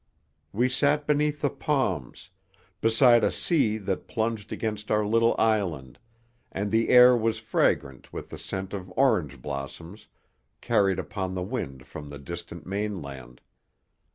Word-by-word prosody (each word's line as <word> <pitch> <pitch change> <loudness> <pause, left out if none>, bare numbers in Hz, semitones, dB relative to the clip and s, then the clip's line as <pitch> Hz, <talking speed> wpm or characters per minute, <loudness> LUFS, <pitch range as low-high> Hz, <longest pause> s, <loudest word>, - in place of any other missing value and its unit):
We 120 +5 +2
sat 145 +3 +2
beneath 150 0 +1
the 145 - +1
palms, 105 - -2 0.5
beside 120 +1 +5
a - - +3
sea 125 -11 +1
that 95 -3 -4
plunged 110 -2 -2
against 105 -1 -4
our 105 0 +2
little 115 +2 +3
island, 90 - 0 0.5
and 100 +1 -3
the 115 +1 +2
air 125 0 +8
was 115 -1 0
fragrant 70 -1 -1
with - - -7
the - - -9
scent 95 0 -5
of 95 -2 -6
orange 90 - +1
blossoms, 80 +9 -7 0.5
carried 95 -2 +2
upon 95 0 -4
the 90 - -2
wind 65 -7 -5
from 75 -1 -9
the 70 - -8
distant 85 +3 -8
mainland. 80 -11 -5
105 Hz, 140 wpm, -26 LUFS, 85-115 Hz, 0.5 s, air